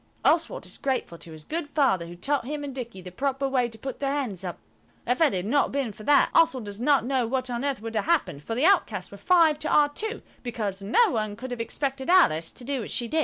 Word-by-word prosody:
Oswald 335 +9 +2
is - - -8
grateful 260 -11 -2
to 165 - -9
his 155 -1 -10
good 320 - -3
Father 265 - +1
who 175 - -9
taught 270 +8 -1
him 295 0 -4
and 280 -2 -5
Dicky 235 -7 -7
the 180 - -8
proper 275 +6 -1
way 255 -3 +1
to 225 - -11
put 265 +3 -6
their 275 -1 0
hands 250 -11 -2
up. 180 -2 -5 0.5
If 250 +6 0
it 320 - +5
had 185 -2 -2
not 280 +7 +2
been 270 -6 -2
for 215 - -13
that, 290 -1 +5
Oswald 265 -8 +3
does 205 +2 -7
not 275 -2 +3
know 255 -2 +1
what 255 +1 -2
on 240 +1 -2
earth 275 -6 -2
would 225 0 -5
have - - 0
happened, 190 - +1
for 225 - -4
the 260 +6 +2
outcasts 400 +2 +2
were - - -10
five 330 -4 +4
to 305 - -2
our 295 -1 +5
two, 440 +9 -4 0.2
because 210 -5 -4
no 355 - +3
one 215 -4 -2
could 250 +3 -7
have 245 -2 -3
expected 270 +3 -3
Alice 165 - +4
to - - -9
do 275 +1 -2
what 225 - -5
she 240 - -2
did. 315 +7 0
260 Hz, 260 wpm, -26 LUFS, 215-290 Hz, 0.5 s, it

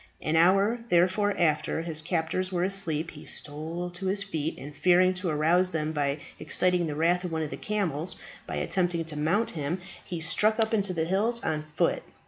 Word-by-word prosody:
An 155 - -1
hour, 195 +7 +4
therefore, 190 +3 +3
after 160 0 +1
his 160 -2 -1
captors 170 +3 -1
were 175 -1 0
asleep 170 -5 -1
he 150 - -11
stole 160 +4 -4
to 180 +2 -5
his 195 +1 +1
feet, 160 -5 -3
and 145 +2 -9
fearing 185 +1 +4
to 185 -1 -3
arouse 165 +4 +3
them 155 -3 -2
by 145 -2 0 0.2
exciting 175 +2 +2
the 150 - -3
wrath 175 +4 +2
of 180 - -4
one 160 -1 -1
of 150 - -5
the - - -3
camels 185 -6 -2 0.3
by - - -4
attempting 170 - 0
to 160 -1 -5
mount 175 +10 +1
him, 155 +3 -3 0.2
he 175 - -5
struck 210 +7 +2
up 220 0 +1
into 200 -3 +2
the 165 -3 -1
hills 210 +7 +1
on 155 -1 -1
foot. - - +2
175 Hz, 195 wpm, -28 LUFS, 155-190 Hz, 0.3 s, hour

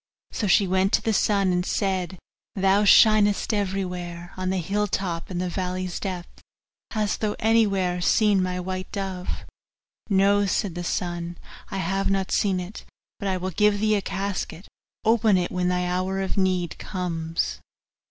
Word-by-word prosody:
So 210 - -2
she 195 +2 +5
went 190 +1 +1
to - - +3
the 220 - +1
sun 200 -2 +2
and 180 0 +1
said, 185 -2 -1 0.4
'Thou 195 +1 +3
shinest 210 0 +5
everywhere, 180 -3 -3
on 185 0 -2
the 190 - 0
hill's 205 +4 -1
top 175 -3 -2
and 180 -2 -3
the 180 - -1
valley's 185 0 -3
depth 185 -3 -6 0.5
hast 215 -2 -1
thou 210 -1 0
anywhere 195 -5 +2
seen 205 +2 +3
my 180 0 -1
white 185 +1 -5
dove?' 190 -3 -4 0.8
'No,' 200 +1 +3
said 195 -1 0
the 175 +1 -5
sun, 175 -1 -3 0.3
'I 195 - -4
have 195 +2 0
not 195 -1 0
seen 195 -3 +2
it; 180 +4 -7 0.4
but 200 - -3
I 190 -1 0
will 185 +1 -3
give 210 +3 +3
thee 215 +1 +2
a 205 - +2
casket 195 -2 -4 0.4
open 220 -3 +4
it 175 -1 -1
when 180 -1 0
thy 180 0 +1
hour 185 +2 -1
of 190 -1 -2
need 185 -3 0
comes. 165 - -3
190 Hz, 165 wpm, -25 LUFS, 180-200 Hz, 0.8 s, she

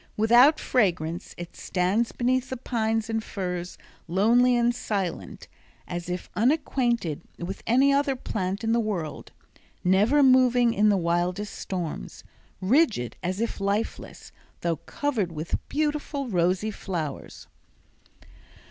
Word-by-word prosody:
Without 240 +7 +6
fragrance, 175 -8 0
it 175 0 -8
stands 195 +6 0
beneath 255 +1 0
the 260 - -4
pines 225 -2 -1
and 225 -1 -2
firs 180 -4 -4 0.3
lonely 235 +8 +4
and 240 0 +2
silent, 200 -7 -4 0.4
as 175 0 -5
if 180 0 -4
unacquainted 240 - +1 0.2
with 185 +3 -6
any 270 +4 +4
other 280 -1 +2
plant 195 -4 -3
in 225 - +1
the 235 - +3
world; 185 -9 -4 0.5
never 210 +11 +4
moving 250 -2 +5
in 210 0 +3
the 200 - +3
wildest 175 +4 -1
storms; 170 - -5 0.4
rigid 210 - +2
as 185 +2 -2
if 230 -1 -2
lifeless, 200 +3 -3 0.3
though 170 -2 0
covered 225 - -2
with 160 +1 -3
beautiful 295 -2 -1
rosy 185 +3 +1
flowers. 170 -8 -5
215 Hz, 120 wpm, -26 LUFS, 180-245 Hz, 0.5 s, Without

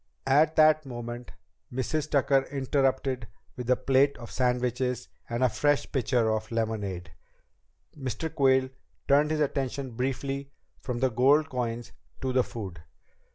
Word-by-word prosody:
At 150 +4 +4
that 155 0 +5
moment 120 -2 -7 0.4
Mrs. 145 +4 -2
Tucker 140 -1 +3
interrupted 135 -2 0 0.3
with 125 -1 -6
a 125 - +6
plate 135 +2 +2
of 120 -1 -10
sandwiches 125 0 0 0.2
and 120 +2 -1
a - - +6
fresh 145 +4 +1
pitcher 125 -4 +1
of 110 0 -2
lemonade. 105 -6 -2 0.8
Mr. 140 +3 -4
Quayle 130 -3 +3 0.4
turned 145 +2 +4
his 155 -1 0
attention 135 -2 -1
briefly 135 +3 -3 0.3
from 125 -2 -4
the 130 -1 +2
gold 140 +7 +4
coins 120 -2 -3 0.3
to 130 -1 -1
the 130 0 +4
food. 95 -10 -7
130 Hz, 135 wpm, -28 LUFS, 120-140 Hz, 0.8 s, a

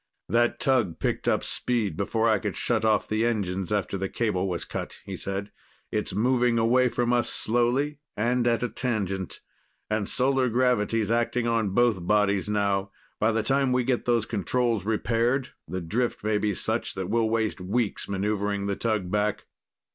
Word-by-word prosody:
"That 120 +1 +2
tug 130 - +2
picked - - -2
up - - +2
speed 115 -9 -1
before 110 +4 0
I 110 -3 +3
could - - -3
shut - - +1
off 110 -1 +2
the 110 +1 0
engines, 95 -5 -1
after 100 -2 -1
the 95 0 -2
cable 100 -5 -1
was 85 -4 -3
cut," - - -5
he 95 - -5
said. 100 +2 -4 0.4
"It's - - -1
moving 120 +1 +2
away 125 +3 +3
from 120 0 0
us 120 -1 +1
slowly, 125 +6 0 0.2
and 120 +3 +1
at 120 0 +2
a 125 - 0
tangent. 100 -7 -2 0.5
And 105 -1 0
solar 130 0 +2
gravity's 115 -3 +1
acting 120 +1 +1
on 115 -3 +1
both 110 -8 +2
bodies 105 -1 +2
now. 100 -2 0 0.3
By 110 +2 +3
the 110 0 0
time 135 +3 +2
we 125 0 +2
get 125 0 0
those 120 -3 +2
controls 115 0 0
repaired, 120 +4 +1 0.2
the 90 +3 -4
drift 115 +9 -2
may 105 -1 +1
be 105 -2 0
such - - -2
that 95 0 -4
we'll 115 -1 +2
waste 110 -4 -1
weeks 105 +3 -1
maneuvering 100 0 -1
the 100 0 -1
tug 105 -6 -1
back." 105 +1 0
110 Hz, 175 wpm, -26 LUFS, 100-120 Hz, 0.5 s, I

